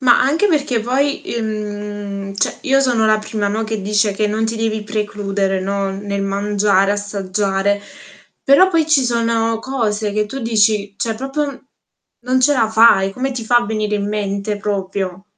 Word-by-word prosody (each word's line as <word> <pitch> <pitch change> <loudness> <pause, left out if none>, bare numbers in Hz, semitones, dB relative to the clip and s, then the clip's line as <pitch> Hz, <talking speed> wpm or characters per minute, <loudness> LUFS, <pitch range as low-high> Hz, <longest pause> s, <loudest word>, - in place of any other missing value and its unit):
Ma 250 -2 +5
anche 320 +10 +2
perché 285 - +1
poi, 265 +3 -1
i - - -2
mhmm, 205 -2 -5
cioè 195 - -1
io 270 0 +3
sono 240 -5 +2
la 215 0 +4
prima, 215 -1 -3
no, 215 +2 -1
che 220 -1 -3
dice 205 +1 +1
che 210 +2 0
non 215 +2 -1
ti 225 +1 -2
devi 220 -1 -1
precludere, 205 -2 -2
no, 195 0 -1
n 195 - -6
nel 200 -1 -2
mangiare, 200 0 +1
assaggiare. 200 0 -1 0.6
Però 280 +7 +6
poi 330 -4 +1
ci 290 -4 +3
sono 230 -1 0
cose 220 -5 -2
che 210 0 0
tu 270 +6 -6
dici 215 -3 +1
cioè 225 +1 -2
proprio 270 +5 -2
n 270 - -16 0.6
non 255 +1 +1
ce 290 +3 +4
la 230 -5 +2
fai, 220 -3 +5
come 265 +5 -2
ti 245 -3 -5
fa 240 +2 +3
a 240 - -2
venire 215 -1 -1
in 205 0 -1
mente 205 0 -2
proprio? 195 -2 -3
215 Hz, 185 wpm, -18 LUFS, 200-235 Hz, 0.6 s, Però